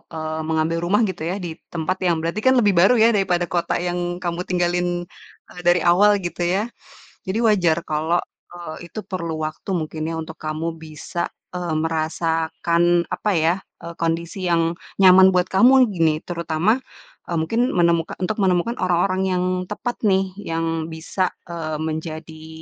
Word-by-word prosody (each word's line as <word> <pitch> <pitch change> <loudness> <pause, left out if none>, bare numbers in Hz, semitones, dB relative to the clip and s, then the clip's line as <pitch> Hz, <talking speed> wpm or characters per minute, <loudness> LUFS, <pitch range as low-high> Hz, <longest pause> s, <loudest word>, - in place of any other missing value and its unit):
eee, 155 0 -3
mengambil 160 +1 0
rumah 190 +6 +2
gitu 185 -5 -2
ya, 185 - -1
di 165 -1 -6
tempat 175 +3 -2
yang 170 - +3
berarti 170 +6 -2
kan 260 +3 +4
lebih 205 -3 +4
baru 190 +7 +5
ya, 230 +1 +5
daripada 180 -5 0
kota 175 -1 0
yang 175 0 -2
kamu 170 0 -2
tinggalin, 175 0 0 0.5
eee, 180 - -11
dari 175 -1 +4
awal 205 +4 +5
gitu 175 - -5 0.2
ya. 220 +4 -2 0.6
Jadi, 190 - -1
wajar 175 -7 +3
kalau, 155 +3 0 0.3
eee, 175 -1 -9
itu 215 - -7
perlu 165 -4 -4
waktu 155 +5 -7
mungkin 155 -1 -3
ya, 165 - -3
untuk 160 0 -7
kamu 155 +2 -3
bisa, 160 +2 -5 0.2
eee, 175 -3 -3
merasakan 165 +1 +1
apa 210 - -1
ya, 165 +2 +3 0.3
eee, 170 - -6
kondisi 170 +3 -2
yang 165 -1 +2 0.2
nyaman 190 0 +8
buat 180 +1 +2
kamu 255 +6 +6
gini, 160 -3 +1
terutama, 170 +5 0 0.5
eee, 170 -2 -1
mungkin 230 +10 0
menemuka 170 -2 +2
untuk 205 +4 -1
menemukan 190 +5 +1
orang-orang 185 +1 +1
yang 180 0 0 0.3
tepat 240 +3 -3
nih 190 -1 +2
yang 165 -2 -2
bisa, 175 +3 -2 0.2
eee, 160 -2 -4
menjadi 160 0 -5
175 Hz, 160 wpm, -22 LUFS, 160-185 Hz, 0.6 s, nyaman